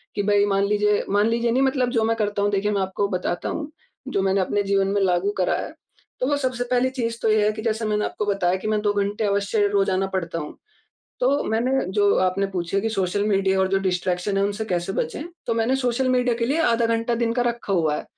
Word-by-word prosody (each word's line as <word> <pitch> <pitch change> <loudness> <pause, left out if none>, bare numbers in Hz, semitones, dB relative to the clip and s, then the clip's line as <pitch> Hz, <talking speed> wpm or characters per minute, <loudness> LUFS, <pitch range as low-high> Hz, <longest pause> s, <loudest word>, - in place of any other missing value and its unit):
कि 205 - 0
भई, 205 0 +3
मान 195 -1 +1
लीजिए 210 0 +1
मान 205 +2 +3
लीजिए 235 0 +1
नहीं, 260 +3 +2
मतलब 260 -2 +1
जो 230 -3 +1
मैं 225 +1 +1
करता 205 -2 -1
हूँ, 205 0 +1
देखिए, 205 +1 0
मैं 200 -1 0
आपको 190 +2 -1
बताता 180 -2 -2
हूँ, 300 -2 -4 0.4
जो 195 - 0
मैंने 195 0 +2
अपने 205 +2 0
जीवन 195 -1 +1
में 200 0 0
लागू 185 +1 +1
करा 180 - +1
है। - - -6 0.5
तो 255 - 0
वो 290 - +2
सबसे 255 -3 -1
पहली 250 +1 +3
चीज़ 230 -3 -3
तो 225 - +1
ये 215 -1 +3
है 215 - +3
कि 220 - -6
जैसे 220 0 -1
मैंने 210 0 0
आपको 210 - -3
बताया 195 -3 +1
कि 190 - -6
मैं 215 0 +1
2 205 -1 +1
घंटे 205 +1 -1
अवश्य 200 +1 +1
रोज़ाना 195 -1 +1
पढ़ता 175 -3 -3
हूँ। 150 - -8 0.6
तो 270 +3 +2
मैंने, 230 +3 0 0.2
जो 205 0 +3
आपने 190 +2 0
पूछे 190 0 -2
कि 225 - -1
सोशल 195 -2 -1
मीडिया 195 -2 +2
और 190 - +2
जो 195 0 +2
डिस्ट्रैक्शन 180 +1 -1
है, 195 - +2
उनसे 205 +2 -2
कैसे 180 -2 -2
बचें, 300 - -3 0.2
तो 230 - 0
मैंने 230 +4 +1
सोशल 255 0 0
मीडिया 250 -1 +2
के 230 0 -1
लिए 285 +6 0
आधा 235 -5 +2
घंटा 230 +1 0
दिन 230 0 0
का 245 +1 0
रखा 235 -4 -2
हुआ 160 -5 +1
है - - -6
205 Hz, 245 wpm, -23 LUFS, 195-230 Hz, 0.6 s, भई